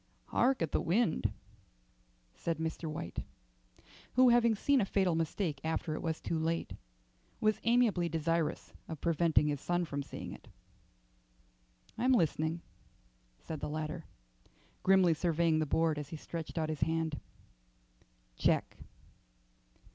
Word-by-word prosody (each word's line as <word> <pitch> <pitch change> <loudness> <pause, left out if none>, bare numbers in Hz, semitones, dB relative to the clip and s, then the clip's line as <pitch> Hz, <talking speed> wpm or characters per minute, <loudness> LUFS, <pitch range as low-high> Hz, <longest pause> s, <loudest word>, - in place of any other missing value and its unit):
"Hark 255 -6 +2
at 160 - -2
the - - +1
wind," 170 - +1 1.0
said 165 -1 -2
Mr. 160 0 -3
White, 85 - -5 0.9
who, 255 0 +6
having 235 -2 +5
seen 275 +5 +3
a - - +2
fatal 190 -3 +2
mistake 160 -2 -1
after 160 0 -1
it - - -4
was 160 -1 -2
too 165 - -2
late, 165 +1 -1 0.7
was 215 0 +2
amiably 230 -7 +3
desirous 165 0 -1
of 160 -3 -6
preventing 165 -1 +3
his 145 -2 -1
son 175 0 0
from 140 -2 -3
seeing - - -7
it. - - -13 1.5
"I'm 255 +2 +4
listening," 160 - +1 0.8
said 160 -2 -7
the - - -4
latter, 155 0 -4 0.8
grimly 185 -3 +5
surveying 165 -1 +2
the 155 - 0
board 160 0 +2
as 145 -1 -6
he 160 - -6
stretched 165 +2 -6
out 155 -1 0
his 155 -2 -4
hand. 160 -2 0 1.2
"Check." - - +1
165 Hz, 130 wpm, -33 LUFS, 155-185 Hz, 1.5 s, who